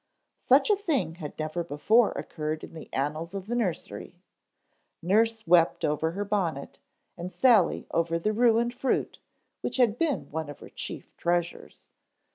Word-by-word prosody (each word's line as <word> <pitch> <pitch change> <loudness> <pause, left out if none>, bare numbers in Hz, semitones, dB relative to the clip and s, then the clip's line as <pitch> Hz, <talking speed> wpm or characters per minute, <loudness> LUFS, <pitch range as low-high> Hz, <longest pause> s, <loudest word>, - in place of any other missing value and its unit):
Such - - +4
a - - +5
thing 305 - -1
had 150 -4 -7
never 155 +2 -2
before 210 +9 +3
occurred 155 0 -4
in - - -9
the 160 - -10
annals 155 +6 -3
of 195 -1 -5
the 230 - -4
nursery. 220 -8 -3 0.8
Nurse 220 +5 +1
wept 170 -1 +4
over 160 +2 0
her 205 +2 -3
bonnet 180 -9 -2 0.4
and 180 +2 -6
Sally 210 0 +3
over 165 0 +1
the 215 +6 -1
ruined 235 +1 +3
fruit 255 +1 -1 0.4
which - - -3
had 240 -3 +3
been 320 -5 -1
one 160 0 -4
of 145 - -8
her - - -11
chief - - -7
treasures. 175 0 -2
180 Hz, 155 wpm, -27 LUFS, 160-230 Hz, 0.8 s, a